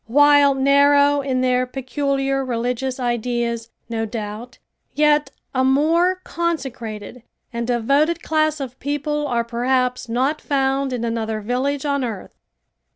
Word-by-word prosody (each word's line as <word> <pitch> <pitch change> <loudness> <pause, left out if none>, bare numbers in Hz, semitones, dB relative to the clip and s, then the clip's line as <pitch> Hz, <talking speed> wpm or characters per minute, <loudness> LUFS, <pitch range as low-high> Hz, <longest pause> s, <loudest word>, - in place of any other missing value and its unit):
While 285 +2 +5
narrow 285 +1 +4
in 260 -2 -1
their 255 0 +1
peculiar 270 +1 -1
religious 250 +1 -2
ideas, 240 -1 -2 0.2
no 225 -1 -2
doubt, 215 +2 -6 0.4
yet 300 -1 +3 0.2
a 260 -1 +1
more 330 +7 +2
consecrated 255 -9 -4 0.3
and 235 0 -3
devoted 275 +7 +1
class 310 -1 +1
of 260 -2 -7
people 295 +1 -2
are 235 -3 0
perhaps 250 +1 -1
not 265 +6 0
found 270 -1 0
in 245 -2 -3
another 225 -1 -2
village 260 +6 -2
on 280 -2 0
earth. 220 -6 -5
265 Hz, 125 wpm, -21 LUFS, 240-285 Hz, 0.4 s, While